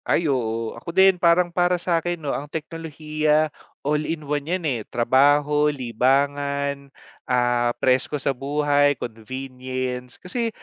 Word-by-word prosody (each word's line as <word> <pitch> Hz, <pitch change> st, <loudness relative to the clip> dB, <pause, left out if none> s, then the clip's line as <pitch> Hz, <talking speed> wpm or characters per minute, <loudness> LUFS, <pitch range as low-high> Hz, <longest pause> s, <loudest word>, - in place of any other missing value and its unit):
Ay, 170 Hz, -, +1 dB
oo. 115 Hz, -5 st, -1 dB
Ako -, -, -9 dB
din, 190 Hz, -2 st, +5 dB
parang 175 Hz, 0 st, +4 dB
para 180 Hz, 0 st, +2 dB
sa'kin, 175 Hz, 0 st, -1 dB
'no, 150 Hz, -4 st, -3 dB
ang 145 Hz, +1 st, -5 dB
teknolohiya, 155 Hz, -1 st, -1 dB, 0.3 s
all 150 Hz, +1 st, +1 dB
in 155 Hz, 0 st, -4 dB
one 145 Hz, +1 st, -2 dB
yan, 180 Hz, -1 st, -1 dB
eh. 125 Hz, -7 st, 0 dB
Trabaho, 145 Hz, +5 st, +3 dB
libangan, 140 Hz, +2 st, 0 dB, 0.4 s
ah, 120 Hz, -1 st, +2 dB
presko 130 Hz, +3 st, +1 dB
sa 140 Hz, 0 st, -1 dB
buhay, 145 Hz, +1 st, +1 dB
convenience. 125 Hz, +2 st, -5 dB
Kasi 230 Hz, +5 st, -3 dB
145 Hz, 130 wpm, -23 LUFS, 130-155 Hz, 0.4 s, din